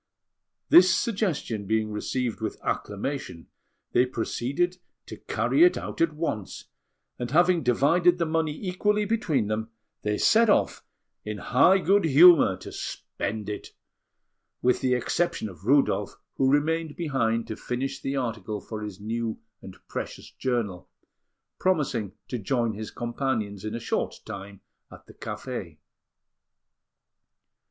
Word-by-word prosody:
This 185 +1 +8
suggestion 170 - -1
being 110 0 0
received 115 +2 -2
with 110 - -4
acclamation, 105 - -4 0.4
they 125 +1 +3
proceeded 140 +9 -1 0.3
to - - -9
carry 320 - +2
it 355 - +5
out - - -5
at 165 -2 +3
once; 150 - -4 0.5
and 120 - -3
having 175 +3 +4
divided 165 +8 +3
the 170 - 0
money 160 -1 0 0.2
equally 210 +3 +1
between 205 - 0
them, 110 +2 -2 0.3
they 105 0 -1
set 230 0 +4
off - - +2 0.4
in 105 0 -4
high 145 - +4
good 195 0 +3
humour 155 - +7
to - - -10
spend 105 0 -5
it, 105 -1 -6 0.9
with 125 0 +3
the 125 -1 +2
exception 125 +1 -1
of 95 -1 -12
Rudolf, 140 +3 +2 0.2
who 135 0 +3
remained 160 +2 +1
behind 115 -8 0
to 110 - -5
finish 125 +4 -4
the 135 - -2
article 110 -5 -3
for 110 +1 -7
his 105 -2 -7
new 115 +1 -3 0.2
and - - -11
precious - - -6
journal, 115 -8 -2 0.7
promising 140 - 0
to 125 - -3
join 115 +2 0
his 110 +1 -6
companions 120 -5 -3
in 110 +1 -4
a - - -3
short 115 - -2
time 100 0 -8 0.3
at - - -14
the - - -15
café. - - -6
125 Hz, 135 wpm, -26 LUFS, 110-165 Hz, 0.9 s, This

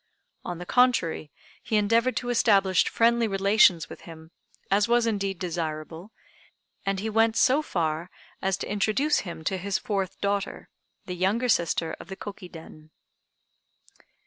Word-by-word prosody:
On 175 - -5
the 175 - -8
contrary, 210 - +1 0.3
he 220 - -2
endeavored 230 +4 +2
to 245 - -3
establish 200 -5 +3
friendly 235 0 +2
relations 195 -4 +4
with - - -11
him, 160 -1 -12 0.4
as 205 +1 +3
was 240 0 +3
indeed 200 -4 -1
desirable, 165 +1 -5 0.8
and 195 -1 0
he 215 - -3
went 225 +1 +2
so 270 +4 +4
far 165 - -2 0.3
as 190 -1 0
to - - -5
introduce 215 +9 +1
him 170 -4 -7
to 190 +4 -1
his 195 +1 -1
fourth 195 -3 -3
daughter, 200 -1 -2 0.4
the 180 - -5
younger 195 +7 0
sister 170 -4 +1
of - - -11
the 190 - -7
Koki 195 -3 -9
Den. 155 -2 -13
195 Hz, 145 wpm, -26 LUFS, 175-225 Hz, 0.8 s, relations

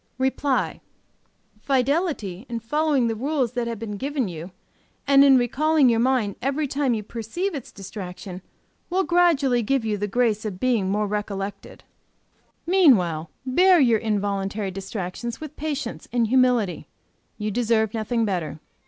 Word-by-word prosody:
"REPLY. 265 +1 0 0.8
Fidelity 270 - 0
in 235 -1 -3
following 290 +2 +1
the 230 - 0
rules 265 +1 -1
that 245 -1 -2
have 230 -1 -3
been 210 -1 -5
given 275 -1 -2
you, 170 0 -7 0.6
and 275 0 +6
in 275 -2 +7
recalling 275 +3 +3
your 230 -1 +2
mind 235 -5 +1
every 280 +4 0
time 275 -3 0
you 215 - -4
perceive 235 - -4
its 275 -6 -7
distraction, 190 -1 -8 0.5
will 375 +2 +1
gradually 320 -9 +3
give 250 +1 0
you 210 -2 -1
the 205 - -1
grace 220 -1 +1
of 200 -4 -5
being 230 -6 +1
more 210 +2 +1
recollected. 205 -1 -5 0.8
Meanwhile 200 - +3 0.2
bear 360 +7 +5
your 235 -6 +4
involuntary 200 -2 -2
distractions 195 +4 -5
with 310 -1 -8
patience 290 -5 -4
and 240 -1 +2
humility; 245 -5 +2 0.5
you 215 -1 -3
deserve 220 -1 +1
nothing 225 +1 0
better. 175 -6 -3
235 Hz, 145 wpm, -24 LUFS, 205-275 Hz, 0.8 s, in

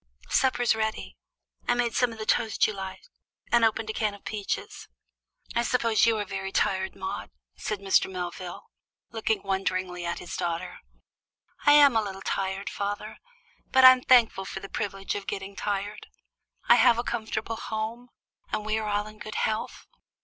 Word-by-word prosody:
Supper's 245 -3 +3
ready. 220 0 -3 0.5
I've 245 - +2
made 240 -1 +1
some 245 -1 +2
of 225 - -9
the 215 - -5
toast 220 0 +2
you 215 - -1
like 190 -1 -7 0.5
and 235 -1 +5
opened 225 0 +2
a - - -9
can 210 -2 -1
of 200 - -18
peaches. 210 -2 -4 0.7
"I 235 - +2
suppose 230 -3 +2
you 225 -1 +3
are 205 - -2
very 195 0 -5
tired, 190 -1 0
Maude," 190 - -5 0.3
said 210 - -3
Mr. 195 -1 +2
Melvin, 180 0 -5 0.5
looking 220 -2 -1
wonderingly 185 -2 -2
at 170 0 -2
his 175 - -7
daughter. 170 -1 -3 0.9
"I'm 290 -3 +8
a 225 - +4
little 195 -2 -6
tired, 195 0 -2
father, 205 +1 -4 0.5
but 260 0 +6
I'm 255 0 +9
thankful 230 -7 +4
for - - -5
the 195 - -9
privilege 195 -1 -3
of 200 -1 -5
getting 195 0 -5
tired. 205 +1 -3 0.6
I 240 - +8
have 235 0 +6
a 235 - 0
comfortable 225 -1 -3
home, 225 +3 -4 0.4
and 210 - -2
we 215 0 0
are 215 -1 -3
all 205 0 0
in 215 0 -12
good 215 - -7
health. 220 0 -2
215 Hz, 170 wpm, -27 LUFS, 195-230 Hz, 0.9 s, I'm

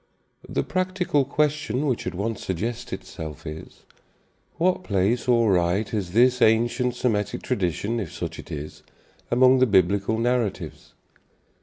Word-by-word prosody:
The - - 0
practical 185 -5 0
question 145 -2 0
which 130 -9 -1
at 90 - -4
once 105 +3 -3
suggests 115 +6 -3
itself 80 -3 -7
is, 75 +1 -9 0.7
What 180 +2 +1
place 100 - 0
or 115 -4 +4
right 90 +3 +1
has 95 -4 -3
this 125 +2 +4
ancient 120 +3 +3
Semitic 105 -5 -1
tradition, 100 +5 -1
if 95 -8 -5
such - - -6
it - - -10
is, 75 0 -7 0.5
among 130 +1 +5
the 130 - +4
Biblical 100 +2 +2
narratives? 120 -3 -2
115 Hz, 135 wpm, -24 LUFS, 95-125 Hz, 0.7 s, among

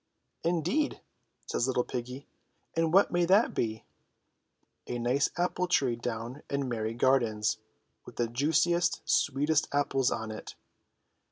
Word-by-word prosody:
"Indeed," 175 - 0 0.5
says 120 - -1
little 125 -2 +1
piggy, 125 +3 -6 0.5
"and 165 -1 +1
what 195 +3 +5
may 175 0 +2
that 195 +6 +4
be?" 110 -1 -2 1.0
"A 120 - -3
nice 125 +4 +1
apple 180 +1 0
tree 135 -8 +2
down 120 +3 -5
in 140 -1 -1
Merry 115 -2 -2
gardens 115 -4 +2 0.5
with - - -12
the 120 - +1
juici 150 +8 +2
est, 175 0 0
sweetest 145 +3 +2
apples 135 -2 +1
on 110 -1 -3
it 110 - -8
135 Hz, 135 wpm, -29 LUFS, 120-165 Hz, 1.0 s, what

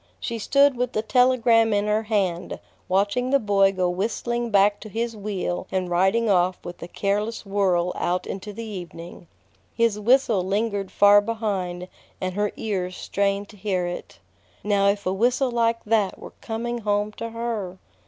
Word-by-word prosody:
She 235 -1 -4
stood 280 +4 +4
with 250 +1 -1
the 215 - -1
telegram 235 -2 +4
in 205 0 +1
her 210 +1 +1
hand, 190 -5 -1 0.3
watching 200 +7 +1
the 275 - +5
boy 200 -4 +3
go 185 -2 0
whistling 230 +6 -2
back 205 0 +3
to 215 - -10
his 230 +2 -3
wheel 195 -3 -3
and 185 -2 -2
riding 190 +6 +2
off 185 -2 +2
with 175 - -8
a 170 - -6
careless 210 +5 -2
whirl 185 -3 +1
out 180 +1 -1
into 195 +2 -6
the 230 +3 -7
evening. 175 -4 -9 0.5
His 230 -3 +2
whistle 230 -3 +3
lingered 200 0 -1
far 205 0 +6
behind, 195 -5 -3 0.3
and 185 0 -3
her 205 +1 0
ears 185 -4 -3
strained 200 0 -1
to 210 - -14
hear 185 -3 -1
it. 175 0 -6 0.5
Now 200 -1 +2
if 200 0 0
a 185 - 0
whistle 245 +5 +1
like 230 -1 +1
that 210 -3 +1
were - - -11
coming 235 +1 -3
home 205 -1 0
to 230 - -4
her! 225 -5 -4
205 Hz, 170 wpm, -24 LUFS, 190-230 Hz, 0.5 s, far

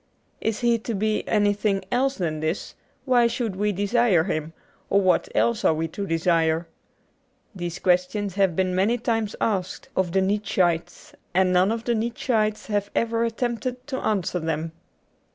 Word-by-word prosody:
If 220 0 -1
he 235 -1 +3
is - - -14
to 230 - -2
be 215 +2 -1
anything 205 -2 +1
else 270 +2 +1
than 160 -7 -2
this, 155 +4 -3 0.3
why 245 -3 +4
should 230 -4 -2
we 210 +2 +1
desire 205 -2 +2
him, 160 -3 -3 0.4
or 200 - +4
what 185 -2 +2
else 235 -2 +2
are 160 - +4
we 165 +1 -1
to 200 +5 -5
desire? 165 -1 +1 0.9
These 175 -2 -5
questions 185 +2 +1
have 190 -3 +2
been 185 0 +1
many 200 +6 +2
times 225 -3 -1
asked 190 -5 -2
of 185 -2 +1
the 190 +2 +2
Nietzscheites, 190 -4 0 0.2
and 185 0 +3
none 185 +3 +4
of 225 0 -2
the 240 - 0
Nietzscheites 220 -1 0
have 205 -2 -1
even 230 0 +1
attempted 245 +2 -3
to 260 -2 -4
answer 190 -4 -1
them. 160 0 -2
200 Hz, 165 wpm, -24 LUFS, 180-230 Hz, 0.9 s, why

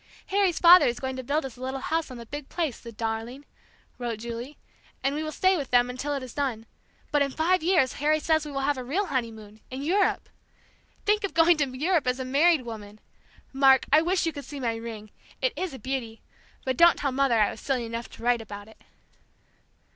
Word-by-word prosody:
"Harry's 390 -4 +2
father 355 +1 +8
is 240 - -1
going 260 -1 -3
to 260 - -4
build 285 +4 -1
us 255 -2 -8
a - - -13
little 260 +1 -3
house 320 +3 -2
on 255 - -8
the 235 - -9
big 290 +3 -8
place, 320 -9 -2
the 235 - -10
darling," 225 +5 -4 0.5
wrote 240 -2 -3
Julie; 235 +5 -7 0.5
"and 275 +1 +1
we 300 - -2
will 310 0 -4
stay 375 +4 +2
with 285 -6 -4
them 245 0 +3
until 285 +3 -3
it 275 - -4
is 255 - -9
done. 255 -6 -2 0.5
But 295 -1 +2
in 280 - +2
five 340 +6 +1
years 325 -6 +2
Harry 305 +1 +3
says 315 0 +1
we 300 - -7
will 275 -1 -2
have 285 -2 0
a - - -5
real 335 +12 -1
honeymoon, 220 - -4
in 260 +2 -6
Europe! 385 +7 +1 0.8
Think 420 0 +2
of 395 - -3
going 335 +1 +6
to 290 -3 0
Europe 320 -1 +1
as 250 +1 0
a 260 - -3
married 290 +3 +3
woman! 215 -3 -9 0.5
Mark, 270 -1 +5
I 310 - +7
wish 360 +2 +1
you 325 - -1
could 285 - -7
see 290 - -8
my 235 -3 -1
ring; 225 -2 -8 0.3
it - - 0
is 370 -3 -3
a 265 - -8
beauty, 255 -4 -5 0.4
but 260 -1 -1
don't 340 0 +6
tell 280 - -1
Mother 260 -3 +2
I 210 - +3
was - - -10
silly 255 -4 -1
enough 230 +1 -5
to - - -13
write 240 -1 +2
about 205 -1 -9
it!" 220 - -18
270 Hz, 225 wpm, -26 LUFS, 235-310 Hz, 0.8 s, father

